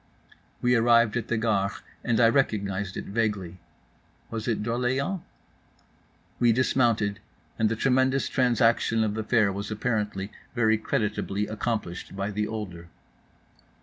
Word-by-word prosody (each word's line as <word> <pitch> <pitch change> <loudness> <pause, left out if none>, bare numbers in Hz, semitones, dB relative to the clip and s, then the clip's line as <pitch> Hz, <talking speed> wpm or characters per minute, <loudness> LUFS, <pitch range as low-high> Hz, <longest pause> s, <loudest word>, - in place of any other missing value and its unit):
We 125 0 +4
arrived 115 -1 +4
at 120 -2 -2
the 120 - 0
Gare, 105 -3 +1 0.3
and 115 -2 +1
I 115 - +7
recognized 100 -6 0
it - - -5
vaguely. 100 -5 -2 0.7
Was 115 0 -4
it 110 -3 0
D'Orléans? 130 - -1 1.2
We 120 -1 +5
dismounted, 115 -4 +2 0.4
and 110 -1 +3
the 115 - 0
tremendous 130 +2 +2
transaction 115 -2 +2
of 105 -1 0
the 110 +1 -3
fare 105 -3 +2
was 100 +2 -5
apparently 105 -3 -2 0.2
very 110 -2 +3
creditably 105 -2 -1
accomplished 105 -5 -4
by 100 +1 -2
the 105 +1 -1
older. 95 -6 -6
110 Hz, 130 wpm, -26 LUFS, 105-120 Hz, 1.2 s, I